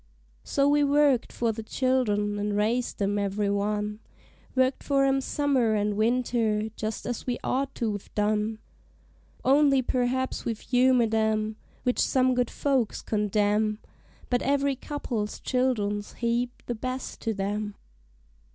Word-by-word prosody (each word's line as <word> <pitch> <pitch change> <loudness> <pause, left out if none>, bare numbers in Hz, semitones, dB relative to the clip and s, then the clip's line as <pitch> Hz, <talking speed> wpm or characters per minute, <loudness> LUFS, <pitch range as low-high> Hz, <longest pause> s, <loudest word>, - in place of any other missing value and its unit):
So 280 0 +1
we 290 0 +4
worked 285 -3 +3
for 235 -1 0
the 225 +1 -6
child'rn, 215 -4 0
and 205 0 -1
raised 230 +4 0
'em 205 +1 +1
every 200 0 0
one; 210 +1 -1 0.6
Worked 260 0 +2
for 275 -1 +2
'em 270 0 +2
summer 260 -6 +1
and 205 0 0
winter, 225 -1 +1
just 215 0 -4
as 245 0 -4
we 245 - 0
ought 270 +1 -1
to 220 -3 -1
've 205 - -9
done; 210 +1 +1 0.9
Only 275 -1 +5
perhaps 255 +1 -1
we 230 - -1
humored 245 -1 +2
'em, 220 0 +1 0.3
which 250 - 0
some 255 -1 +3
good 245 -1 +1
folks 265 -6 0
condemn, 210 0 +1 0.5
But 245 -1 +1
every 280 0 +1
couple's 245 -6 -4
child'rn 230 -6 0
's 205 - -14
heap 240 +1 -2
the 240 - -2
best 255 +3 -5
to 225 -2 -1
them. 205 +1 -2
235 Hz, 140 wpm, -27 LUFS, 210-260 Hz, 0.9 s, Only